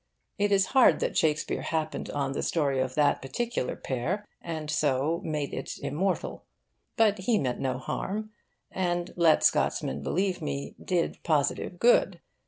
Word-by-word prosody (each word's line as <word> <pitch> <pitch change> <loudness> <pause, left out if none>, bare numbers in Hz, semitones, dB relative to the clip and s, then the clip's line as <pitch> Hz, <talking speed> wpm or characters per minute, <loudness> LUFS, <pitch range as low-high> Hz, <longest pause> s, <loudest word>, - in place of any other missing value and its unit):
It 205 0 +2
is 195 -1 +4
hard 265 -2 +6
that - - -1
Shakespeare 155 -1 +1
happened 155 -1 -2
on 140 -2 -1
the 135 - -2
story 140 -5 0
of 130 0 -1
that 150 -1 +3
particular 230 - -2
pair, 170 +12 -3
and 160 -2 -5
so 150 +2 +1
made 150 -2 -3
it - - -5
immortal. 180 +6 -2 0.5
But 215 -3 +4
he 215 +4 +2
meant 125 -8 -1
no 130 -1 -1
harm, 210 +11 -4 0.4
and, 175 -1 -1
let 170 -2 +4
Scotsmen 70 +2 +1
believe 185 - -1
me, 70 0 -4
did 175 -2 -1
positive 155 +2 0
good. 195 -5 +4
160 Hz, 150 wpm, -28 LUFS, 140-190 Hz, 0.5 s, hard